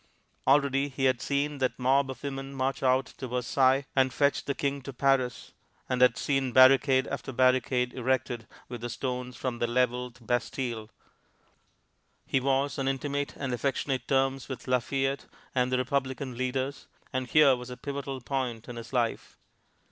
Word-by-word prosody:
Already, 140 Hz, 0 st, +3 dB
he 135 Hz, 0 st, -2 dB
had 130 Hz, -3 st, +2 dB
seen 145 Hz, +1 st, -1 dB
that 130 Hz, -1 st, 0 dB
mob 135 Hz, +2 st, +2 dB
of 130 Hz, -, -7 dB
women 135 Hz, -1 st, -5 dB
march 135 Hz, +1 st, -1 dB
out 130 Hz, 0 st, +3 dB
to 130 Hz, -, -8 dB
Versailles 130 Hz, +2 st, +2 dB
and 130 Hz, -1 st, +3 dB
fetch 140 Hz, +2 st, +1 dB
the 140 Hz, -, -1 dB
King 140 Hz, 0 st, -1 dB
to 135 Hz, -, -7 dB
Paris, 130 Hz, -2 st, 0 dB, 0.4 s
and 125 Hz, -1 st, -1 dB
had 125 Hz, -1 st, +5 dB
seen 135 Hz, -2 st, 0 dB
barricade 130 Hz, 0 st, +6 dB
after -, -, -5 dB
barricade 130 Hz, 0 st, +2 dB
erected 125 Hz, -2 st, -1 dB, 0.2 s
with 120 Hz, -2 st, -7 dB
the 120 Hz, -, -4 dB
stones 125 Hz, 0 st, -4 dB
from 125 Hz, -3 st, -3 dB
the 120 Hz, -, +1 dB
leveled 125 Hz, 0 st, -1 dB
Bastile; 120 Hz, -1 st, -2 dB, 1.4 s
he 135 Hz, -, +1 dB
was 135 Hz, +2 st, 0 dB
on 135 Hz, -, -1 dB
intimate 140 Hz, +1 st, -2 dB
and 135 Hz, -3 st, -3 dB
affectionate 130 Hz, 0 st, -1 dB
terms 135 Hz, 0 st, +1 dB
with 130 Hz, -, -7 dB
Lafayette 135 Hz, +2 st, 0 dB, 0.3 s
and 125 Hz, -1 st, +1 dB
the 130 Hz, -, +2 dB
Republican 130 Hz, 0 st, -2 dB
leaders, 130 Hz, +2 st, -3 dB, 0.3 s
and 130 Hz, -1 st, -1 dB
here 140 Hz, 0 st, +6 dB
was 125 Hz, 0 st, -8 dB
a 125 Hz, -, -7 dB
pivotal 140 Hz, -2 st, -5 dB
point 120 Hz, -3 st, -3 dB
in 120 Hz, -, -7 dB
his 115 Hz, 0 st, -8 dB
life. 120 Hz, -3 st, -1 dB
130 Hz, 165 wpm, -28 LUFS, 125-135 Hz, 1.4 s, barricade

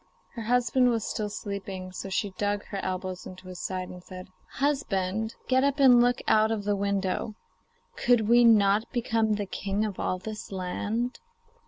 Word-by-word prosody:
Her 235 Hz, -, -6 dB
husband 245 Hz, +2 st, +3 dB
was 230 Hz, -2 st, 0 dB
still 210 Hz, -1 st, -2 dB
sleeping, 195 Hz, -3 st, -6 dB
so 190 Hz, +1 st, -6 dB
she 200 Hz, +1 st, -1 dB
dug 205 Hz, +1 st, -2 dB
her 200 Hz, -, -4 dB
elbows 185 Hz, -1 st, -4 dB
into 185 Hz, 0 st, -11 dB
his 180 Hz, -, -8 dB
side 185 Hz, -1 st, -3 dB
and 180 Hz, 0 st, -10 dB
said: 185 Hz, 0 st, -10 dB, 0.2 s
'Husband, 220 Hz, -7 st, -1 dB
get 260 Hz, 0 st, +3 dB
up 280 Hz, +1 st, +1 dB
and 250 Hz, -3 st, +7 dB
look 245 Hz, 0 st, +2 dB
out 215 Hz, 0 st, +4 dB
of 215 Hz, -2 st, -1 dB
the 205 Hz, 0 st, +1 dB
window. 200 Hz, +1 st, -1 dB, 0.6 s
Could 235 Hz, -3 st, +3 dB
we 240 Hz, +1 st, +6 dB
not 215 Hz, -1 st, +4 dB
become 230 Hz, -3 st, +1 dB
the 205 Hz, -1 st, -2 dB
king 200 Hz, +2 st, -2 dB
of 205 Hz, -3 st, -5 dB
all 185 Hz, -, -1 dB
this 215 Hz, +3 st, -7 dB
land? 205 Hz, +6 st, -2 dB
205 Hz, 175 wpm, -27 LUFS, 190-235 Hz, 0.6 s, and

